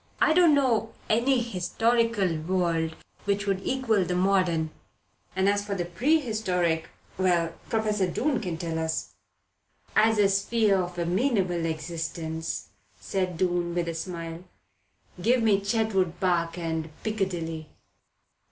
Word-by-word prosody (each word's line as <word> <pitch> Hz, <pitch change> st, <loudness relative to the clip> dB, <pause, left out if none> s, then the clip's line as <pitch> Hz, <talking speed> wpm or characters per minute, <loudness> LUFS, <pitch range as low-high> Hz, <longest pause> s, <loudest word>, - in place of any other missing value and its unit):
"I 315 Hz, -, +4 dB
don't 335 Hz, -3 st, +6 dB
know 235 Hz, -5 st, +1 dB, 0.2 s
any 245 Hz, +4 st, +3 dB
historical 225 Hz, -1 st, +1 dB
world 165 Hz, -1 st, 0 dB, 0.3 s
which 200 Hz, 0 st, 0 dB
would 195 Hz, -1 st, 0 dB
equal 230 Hz, -7 st, +1 dB
the 180 Hz, 0 st, -2 dB
modern, 180 Hz, -4 st, +2 dB, 0.6 s
and 190 Hz, +1 st, +2 dB
as 205 Hz, 0 st, +2 dB
for 205 Hz, -1 st, -3 dB
the 175 Hz, -2 st, -2 dB
prehistoric 185 Hz, -, +1 dB, 0.3 s
well, 175 Hz, -3 st, +2 dB, 0.2 s
Professor 210 Hz, -4 st, +1 dB
Doon 265 Hz, -, 0 dB
can 175 Hz, -5 st, -3 dB
tell 160 Hz, -1 st, -3 dB
us 160 Hz, 0 st, -2 dB, 0.4 s
" -, -, -45 dB
"As 220 Hz, 0 st, +4 dB
a 205 Hz, -1 st, +5 dB
sphere 200 Hz, 0 st, +2 dB
of 175 Hz, 0 st, -5 dB
amenable 180 Hz, -2 st, +1 dB
existence," 160 Hz, 0 st, -4 dB, 0.3 s
said 185 Hz, -3 st, -2 dB
Doon 175 Hz, -1 st, 0 dB
with 175 Hz, -1 st, 0 dB
a 165 Hz, -, -2 dB
smile, 165 Hz, 0 st, -5 dB, 0.8 s
"give 240 Hz, +4 st, +3 dB
me 205 Hz, -3 st, +4 dB
Chetwood 200 Hz, -4 st, 0 dB
Park 170 Hz, -2 st, +1 dB
and 160 Hz, -2 st, -2 dB
Piccadilly." 175 Hz, -7 st, -2 dB
185 Hz, 130 wpm, -27 LUFS, 170-220 Hz, 0.8 s, don't